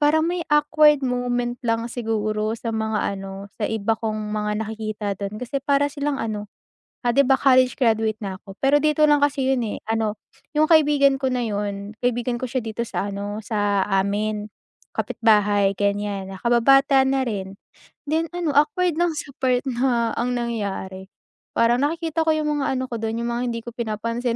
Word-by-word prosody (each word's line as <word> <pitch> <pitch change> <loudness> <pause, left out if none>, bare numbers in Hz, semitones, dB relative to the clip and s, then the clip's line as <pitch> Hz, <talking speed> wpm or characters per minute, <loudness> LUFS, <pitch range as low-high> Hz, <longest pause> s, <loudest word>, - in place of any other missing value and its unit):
parang 310 +2 +3
may 355 0 -1
awkward 300 0 +5
moment 245 -1 -1
lang 230 0 0
siguro 215 -2 -1
sa 230 - -4
mga 220 -2 -1
ano, 195 +1 -8
sa - - +1
iba 220 0 0
kong 215 -2 -3
mga 210 0 -1
nakikita 215 -1 -5
dun 200 +1 -4
kasi 250 +3 -2
para 285 +1 +2
silang 285 -1 -2
ano, 210 -2 -4 0.6
ah, 240 - +3
'di 280 +3 +4
ba 270 - +5
college 255 -2 +4
graduate 220 -3 +2
na 190 -1 -4
ako, 195 0 -12
pero 275 +2 +4
dito 305 +1 +3
lang 295 -1 +4
kasi 275 -2 0
yun 255 - -1
eh. - - -4
Ano 220 -1 0 0.4
yung 305 - +5
kaibigan 290 -3 +5
ko 265 - +1
na 245 -1 0
yun, 205 -1 -3
kaibigan 245 0 0
ko 255 - -2
siya 255 +1 -1
dito 220 +1 -5
sa 205 -3 -3
ano, 205 +2 -4
sa 205 -3 +1
amin, 205 +2 0 0.5
kapitbahay 205 -3 +2
ganyan 200 -1 -1
na 190 - -8
kababata 270 +3 +4
na 265 0 +1
rin. 195 -3 -5 0.5
Then 320 +2 +1
ano, 330 -5 -1
awkward 300 +4 +2
lang 345 -1 +2
sa 295 -1 -6
part 255 -1 +1
na 240 -2 +1
ang 245 +1 -1
nangyari, 195 -5 -4 0.4
parang 235 +2 +3
nakikita 325 +1 0
ko - - +5
yung 300 -1 0
mga 270 - 0
ano 260 0 -1
ko - - -2
dun, 225 +1 -2
yung 235 - -2
mga 240 - -1
hindi 230 - -3
ko 235 - -7
pinapansin. 230 +1 -2
235 Hz, 180 wpm, -23 LUFS, 210-275 Hz, 0.6 s, awkward